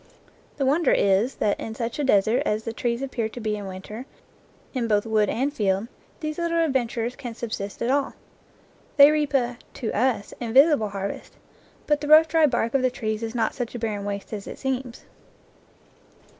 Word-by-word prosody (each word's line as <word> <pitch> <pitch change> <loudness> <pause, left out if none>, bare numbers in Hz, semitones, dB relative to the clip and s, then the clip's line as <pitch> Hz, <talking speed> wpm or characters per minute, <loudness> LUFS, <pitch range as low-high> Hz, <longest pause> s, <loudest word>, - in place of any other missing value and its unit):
The 275 - 0
won 290 +6 +3
der - - +3
is 200 +6 +2
that 205 - 0
in 220 - -6
such 230 +4 -4
a - - +1
desert 220 -2 +3
as 215 +1 -1
the 230 - -4
trees 235 +2 -2
appear 240 -5 -2
to 245 - -9
be 215 -2 -1
in 205 -2 -6
winter, 210 +7 -8 0.7
in 250 -4 -1
both 210 -1 +2
wood 215 -2 +2
and 270 +5 -1
field, 200 -2 0 0.3
these 310 +1 -4
little 335 0 0
adven 270 -7 +2
turers 235 +1 -3
can 245 -4 -7
subsist 215 -3 -5
at 240 - +1
all. 280 0 0 0.8
They 285 +1 +9
reap 295 -2 0
a, 245 -2 0 0.2
to 225 - -3
us, 235 -2 0
invisible 255 0 +4
harvest, 200 0 -6 0.5
but 295 -1 +1
the 295 - -4
rough 310 +2 +8
dry 320 -1 +4
bark 235 -3 -1
of 275 - +3
the 255 - +3
trees 220 -3 -3
is 225 +1 -4
not 225 -2 0
such 245 -2 -5
a - - -2
barren 215 -3 -3
waste 200 +1 -5
as 205 -2 -6
it - - -7
seems. 260 -2 -4
235 Hz, 200 wpm, -24 LUFS, 215-275 Hz, 0.8 s, They